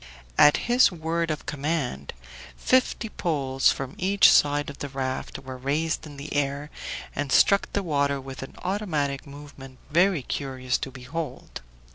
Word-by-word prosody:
At 145 - +7
his 245 -1 +5
word 165 0 -2
of 155 -1 -3
command 145 - -2 0.4
fifty 255 -2 +2
poles 140 -10 +1
from 135 -1 -5
each 195 +2 +5
side 145 0 +3
of 140 - -14
the 145 - -4
raft 130 -1 -4
were 130 -1 -8
raised 155 +4 -1
in 145 -2 -11
the 140 +2 -7
air, 145 +1 -1 0.4
and 145 -1 -2
struck 200 +7 +4
the 200 - 0
water 140 -4 +1
with 135 0 -8
an 135 - -9
automatic 155 -9 -2
movement 140 -2 -11
very 175 -2 +3
curious 130 -1 -2
to - - -4
behold. 130 +2 -6
145 Hz, 150 wpm, -26 LUFS, 135-165 Hz, 0.4 s, At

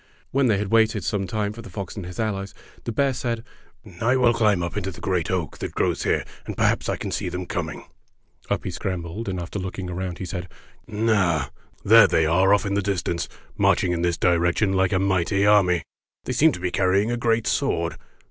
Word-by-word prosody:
When 135 0 +2
they 110 -4 +3
had 100 0 -2
waited 110 -2 +3
some 100 +1 -1
time 105 +1 -2
for 115 - -9
the 115 - -11
fox 100 -4 -6
and 100 -5 -6
his 90 - -9
allies, 100 -3 -2 0.3
the 120 - -2
bear 135 +4 +1
said, 120 -2 -3 0.6
"I 120 +3 +3
will 125 -2 +4
climb 105 -6 +2
up 85 - -4
into 100 -2 -2
the 90 - -10
great 90 -5 -1
oak 90 -4 -2
that - - -5
grows - - 0
here, - - 0 0.2
and - - -5
perhaps - - +1
I - - +1
can - - -5
see - - -2
them 90 0 -4
com 85 -2 -3
ing." - - -9 0.6
Up - - -1
he - - -3
scrambled, 95 +3 -4
and 95 -1 -3
after 85 +4 -5
looking 95 0 -5
around, 90 0 -4
he 95 - -5
said: 90 0 -5 0.4
''Ah! 95 - +1 0.3
there - - +8
they 80 - +2
are 90 +5 +3
off 100 0 +3
in 100 - -1
the 100 - +1
dis 95 -2 -1
tance 85 -1 -2 0.3
marching 90 - +2
in 85 -1 -1
this 85 -1 +1
direction 90 +3 +2
like 95 -1 +2
a 95 - +2
mighty 95 +1 +1
army. 95 -5 +4 0.4
They 130 - -3
seem 155 +6 +5
to - - -6
be 90 0 -2
carrying 100 +4 +2
a - - 0
great 115 -1 +1
sword. 85 0 0
95 Hz, 225 wpm, -24 LUFS, 90-110 Hz, 0.6 s, there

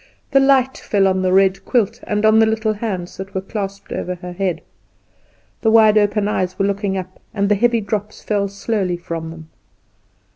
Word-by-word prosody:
The 275 - +5
light 270 -1 +3
fell 195 -2 +1
on 190 0 +1
the 185 -1 +1
red 190 0 +3
quilt, 230 -1 0
and 210 0 -1
the 220 - +6
little 220 0 +3
hands 200 -5 -5
that 195 +1 -8
were 190 - 0
clasped 195 0 -6
over 180 - -3
the 180 0 -8
head. 180 -1 -2 1.0
The 220 - +2
wide 220 -1 +6
open 205 0 +2
eyes 185 -3 -1
were 195 - +1
looking 200 -1 -1
up, 185 0 -7 0.2
and 200 -1 +1
the - - +5
heavy 235 +2 +2
drops 210 +1 -4
fell 205 -2 0
slowly 200 -2 -2
from 165 -2 -6
them. 160 -1 -11
200 Hz, 185 wpm, -19 LUFS, 185-220 Hz, 1.0 s, the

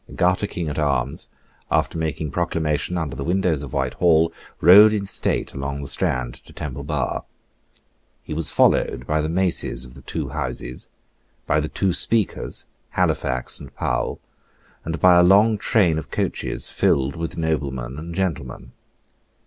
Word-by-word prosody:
Garter 90 +3 +2
King 85 -4 -4
at 75 0 -3
arms, 70 -3 -1 0.4
after - - +1
making 80 -2 -2
proclamation 80 0 -1
under 75 -6 -3
the 70 - -4
windows 90 -3 +1
of 70 -3 -7
Whitehall, 80 +5 +2 0.3
rode 105 +6 +8
in 100 -2 -1
state - - -1
along 70 +1 -4
the - - -6
Strand 60 -2 -1
to - - -16
Temple 70 -1 -6
Bar. 75 -3 -2 1.0
He - - -6
was 80 0 0
followed 60 - +2
by 75 +3 +1
the 75 - -2
maces 85 -7 0
of 60 - -13
the 70 - -13
two 70 +1 -4
Houses, 65 -3 -5 0.6
by 75 - +2
the 75 +1 -2
two 95 -2 0
Speakers, 110 +1 0 0.3
Halifax 65 0 0
and - - -12
Powle, - - -1 0.7
and 80 +1 -4
by 90 -1 +6
a - - +6
long 105 +4 +5
train 90 -8 +2
of 75 -3 -9
coaches - - -3
filled 70 0 +1
with 80 -1 -5
noblemen 70 -5 -2
and 85 +2 -7
gentlemen. 70 -10 -3
80 Hz, 155 wpm, -22 LUFS, 70-90 Hz, 1.0 s, rode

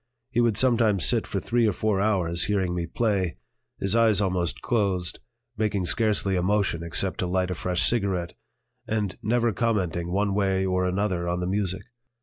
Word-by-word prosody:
He 120 -1 +2
would 115 -3 +2
sometimes 115 -7 +3
sit - - +1
for - - -2
three 120 -1 +1
or 105 - +1
four 105 0 0
hours 90 -5 +1
hearing 95 -3 0
me 85 -1 -3
play, 95 - -1 0.4
his 95 +2 0
eyes 115 -3 +4
almost 90 -4 -1
closed, 95 -6 0 0.4
making 105 -4 0
scarcely 105 -1 +1
a 90 - +1
motion 95 -3 +1
except 85 +3 -1
to 90 - 0
light 90 0 0
a - - 0
fresh 90 +1 +1
cigarette, 95 -7 -1 0.5
and 105 -3 -1
never 120 +1 +1
commenting 90 -6 -1
one 100 +1 +1
way 95 -1 +1
or 90 0 0
another 90 -2 -1
on 90 0 -1
the 90 - -2
music. 95 0 -1
95 Hz, 175 wpm, -25 LUFS, 90-105 Hz, 0.5 s, eyes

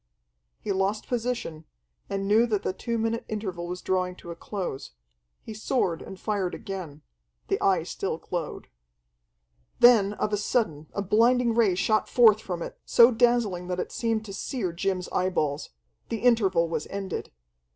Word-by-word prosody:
He - - -3
lost 195 +2 -1
position, 235 -10 -3 0.5
and 195 0 -2
knew 220 +4 +4
that 210 -3 -1
the - - -1
two 235 +4 -3
minute 225 +1 -1
interval 190 -5 -4
was 180 +1 -6
drawing 185 -1 0
to 170 - -10
a - - -6
close. 175 - -5 0.5
He 220 - -7
soared 210 -6 -1
and 190 - -9
fired 200 -4 -1
again. 170 -7 -7 0.5
The - - 0
Eye 185 -4 +3
still 180 0 -3
glowed. 170 -2 -5 1.1
Then 220 -5 +6
of 210 0 -2
a - - +3
sudden 175 - -1
a 200 - -1
blinding 235 +4 +3
ray 220 -5 +3
shot 215 +3 +1
forth 220 -3 +6
from 175 -4 -4
it, - - -9
so 235 +1 +6
dazzling 225 -7 +2
that 180 0 -2
it - - -3
seemed 225 -2 -1
to 200 - -8
sear 195 - -3
Jim's 185 +1 -2
eyeballs. 155 -6 -1 0.4
The 225 - -3
interval 195 -9 +3
was 160 -2 -3
ended. 195 -2 -5
195 Hz, 160 wpm, -26 LUFS, 180-225 Hz, 1.1 s, Then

